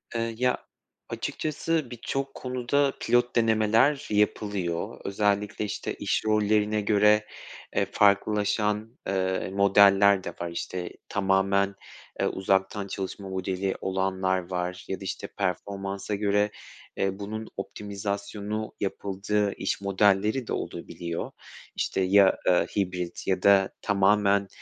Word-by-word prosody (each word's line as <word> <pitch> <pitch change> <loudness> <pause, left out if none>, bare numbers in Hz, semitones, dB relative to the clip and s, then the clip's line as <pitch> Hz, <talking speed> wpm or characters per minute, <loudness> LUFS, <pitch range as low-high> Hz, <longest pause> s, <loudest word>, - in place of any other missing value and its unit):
Eee, 115 0 -1
ya, 125 +1 +2 0.5
açıkçası 155 -1 -2
birçok 135 +3 -3
konuda 130 +2 0
pilot 120 0 +2
denemeler 115 +5 +3
yapılıyor. 100 -4 -1
Özellikle, 105 +1 0
işte, 100 - -4
iş - - -1
rollerine 105 0 +2
göre, 105 +1 +4 0.5
e, - - +2
farklılaşan, 105 +2 +1
eee, 95 -1 -1
modeller 100 0 +5
de - - -4
var, 85 - -2
işte, 90 +1 -4 0.2
tamamen, 100 0 +2 0.4
eee, - - +2
uzaktan 95 +1 0
çalışma 95 0 -5
modeli 95 0 -2
olanlar 95 -1 -1
var 90 0 -3
ya 95 - -3
da - - -9
işte 95 - -4
performansa 100 +1 -3
göre, 105 0 +1 0.5
eee, 95 0 -1
bunun 110 +2 -5
optimizasyonu 100 +1 -4
yapıldığı 100 +1 -1
iş - - -2
modelleri 100 +5 +2
de - - -2
olabiliyor. 85 -1 -5 0.4
İşte, - - -1
ya, 95 +1 +5
eee, 90 -1 +4
hibrit 90 -3 -2
ya 95 -1 0
da 100 -1 +5
tamamen, 100 0 +3
100 Hz, 115 wpm, -27 LUFS, 95-105 Hz, 0.5 s, modeller